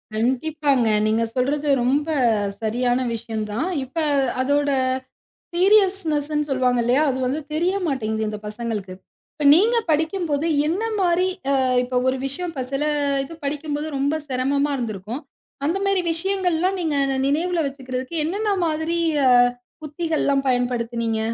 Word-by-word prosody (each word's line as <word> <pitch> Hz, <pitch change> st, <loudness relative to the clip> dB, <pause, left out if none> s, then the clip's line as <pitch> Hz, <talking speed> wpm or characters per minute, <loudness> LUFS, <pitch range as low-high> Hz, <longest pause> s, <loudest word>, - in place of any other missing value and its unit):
கண்டிப்பாங்க. 265 Hz, +1 st, +1 dB, 0.2 s
நீங்க 220 Hz, +1 st, +1 dB
சொல்றது 285 Hz, +4 st, 0 dB, 0.2 s
ரொம்ப 280 Hz, +5 st, +1 dB, 0.5 s
சரியான 245 Hz, +3 st, 0 dB
விஷயம் 225 Hz, -1 st, -4 dB
தான். 235 Hz, +11 st, -1 dB, 0.2 s
இப்ப 265 Hz, +5 st, -12 dB, 0.4 s
அதோட 285 Hz, +2 st, +1 dB, 0.9 s
சீரியஸ்ன்ஸ்ன்னு 345 Hz, -7 st, +2 dB
சொல்லுவாங்க 255 Hz, -2 st, +1 dB
இல்லையா? 250 Hz, +5 st, +3 dB
அது 260 Hz, -, -1 dB
வந்து 265 Hz, +5 st, -1 dB
தெரியமாட்டேங்குது 290 Hz, -, -1 dB
இந்த 210 Hz, 0 st, -5 dB
பசங்களுக்கு. 210 Hz, -3 st, -4 dB, 0.4 s
இப்ப 300 Hz, -1 st, -4 dB
நீங்கப் 450 Hz, +4 st, +3 dB
படிக்கும்போது 320 Hz, -1 st, 0 dB, 0.2 s
என்ன 360 Hz, +7 st, -1 dB, 0.2 s
மாரி 360 Hz, 0 st, +2 dB, 0.2 s
அ -, -, +3 dB, 0.3 s
இப்ப 250 Hz, 0 st, -5 dB
ஒரு 260 Hz, 0 st, +1 dB
விஷயம் 335 Hz, +5 st, -5 dB, 0.2 s
சில 275 Hz, +2 st, 0 dB, 0.4 s
இது 330 Hz, +5 st, -9 dB
படிக்கும்போது 295 Hz, +1 st, -3 dB
ரொம்ப 280 Hz, +3 st, 0 dB
சிரமமா 280 Hz, +2 st, 0 dB
இருந்திருக்கும். 225 Hz, +1 st, -5 dB, 0.4 s
அந்த 335 Hz, +5 st, +1 dB
மாரி 395 Hz, -1 st, +2 dB
விஷயங்கள்லாம் 370 Hz, +1 st, 0 dB
நீங்க 315 Hz, -3 st, 0 dB, 0.3 s
நினைவுல 335 Hz, +4 st, 0 dB
வச்சுக்கிறதுக்கு, 260 Hz, +2 st, -5 dB
என்னென்ன 410 Hz, +6 st, -1 dB, 0.2 s
மாதிரி 320 Hz, +2 st, -1 dB, 0.9 s
உத்திகள் 320 Hz, +1 st, -2 dB
எல்லாம் 275 Hz, -1 st, +1 dB
பயன்படுத்துனீங்க? 235 Hz, -2 st, 0 dB
285 Hz, 120 wpm, -22 LUFS, 250-330 Hz, 0.9 s, இல்லையா